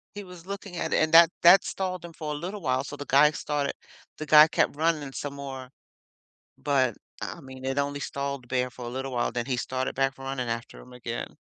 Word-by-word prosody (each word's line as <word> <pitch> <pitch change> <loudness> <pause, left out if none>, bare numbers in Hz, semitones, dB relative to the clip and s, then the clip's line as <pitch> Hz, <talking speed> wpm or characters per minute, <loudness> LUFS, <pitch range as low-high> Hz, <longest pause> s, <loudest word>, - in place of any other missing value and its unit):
He 205 - -6
was 180 -3 -12
looking 200 -2 -7
at - - -2
it, - - +3
and 155 +1 -1
that 165 0 +9
that 180 +2 +8
stalled 185 -2 -3
him 170 -1 -9
for 155 -2 -5
a - - -3
little 185 +7 -5
while, 130 -3 0
so 145 - -7
the 145 - -7
guy 140 +2 +6
started 145 -2 -2 0.4
the 155 - -5
guy 150 0 +8
kept 155 - +1
running 155 -2 0
some 140 +1 -5
more. 135 -2 -7 0.9
But, 130 -5 +1 0.2
I - - -6
mean, 130 -1 -11
it 135 +1 -1
only 145 0 -1
stalled 140 -2 -4
the - - -20
bear 125 +1 -1
for 125 0 -10
a - - -4
little 135 +2 -4
while, 120 - 0
then 120 -1 -3
he 130 - -1
started 130 +1 -2
back 135 0 +1
running 135 -2 -4
after 115 0 -5
him 125 - -15
again. 120 -1 -6
140 Hz, 230 wpm, -27 LUFS, 130-155 Hz, 0.9 s, that